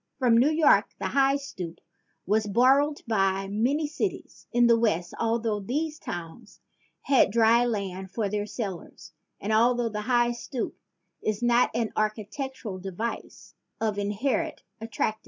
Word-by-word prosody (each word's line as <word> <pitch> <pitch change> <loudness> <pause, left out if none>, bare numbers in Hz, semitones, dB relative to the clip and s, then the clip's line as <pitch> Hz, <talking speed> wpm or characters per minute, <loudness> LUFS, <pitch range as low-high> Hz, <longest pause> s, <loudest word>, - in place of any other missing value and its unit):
From 250 -4 +3
New 250 +5 +5
York 310 -1 +3
the - - -3
high 275 0 +3
stoop 180 -12 -6 0.5
was 210 +3 +1
borrowed 270 +7 +3
by 195 -3 +1
many 245 +10 0
cities 310 +7 -4
in 240 0 +4
the 235 0 +6
West, 205 -7 0
altho 225 -2 0
these 300 +9 -3
towns 175 - -8 0.4
had 270 -6 +4
dry 230 +2 +4
land 190 -4 -3
for 215 +1 -2
their 205 +1 -2
cellars 195 -6 -7 0.3
and 215 +2 -2
altho 240 +1 +3
the 210 -1 -4
high 240 +1 +2
stoop 240 +1 -5 0.5
is 215 +2 -2
not 240 0 +4
an 230 -2 -1
architectural 215 0 -3
device 195 +5 -6 0.3
of 215 -2 -1
inherent 260 +11 -1 0.2
attractiveness. 215 -1 -2
230 Hz, 140 wpm, -27 LUFS, 205-255 Hz, 0.5 s, the